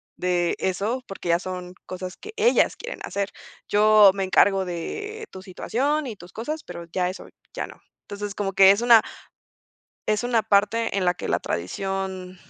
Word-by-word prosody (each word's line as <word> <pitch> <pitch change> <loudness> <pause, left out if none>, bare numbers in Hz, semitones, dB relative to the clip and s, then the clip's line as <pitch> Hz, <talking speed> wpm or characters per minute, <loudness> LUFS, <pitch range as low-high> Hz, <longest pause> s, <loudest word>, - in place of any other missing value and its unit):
de 175 -1 0
eso, 205 +7 -1
porque 195 -3 -6
ya 170 - +5
son 180 0 -7
cosas 185 0 -7
que 430 +2 -10
ellas 460 +2 +3
quieren 480 - -7
hacer. 200 0 -2 0.4
Yo 210 0 +6
me 195 - -1
encargo 190 +1 +3
de 420 - -5
tu 190 - -10
situación 270 +10 -1
y 230 - -5
tus 175 -1 -14
cosas, 300 +8 -4
pero 170 - -8
ya 180 +1 0
eso 185 - -8 0.3
ya - - -4
no". - - -14 0.2
Entonces, 205 0 -6
como 200 -1 -3
que 195 0 +8
es 200 +3 +1
una 235 -2 +7 1.1
es 215 +3 +1
una 235 -2 +2
parte 215 +1 +2
en 185 - 0
la 180 0 +3
que - - -6
la - - +2
tradición 190 - -4
195 Hz, 180 wpm, -24 LUFS, 185-230 Hz, 1.1 s, que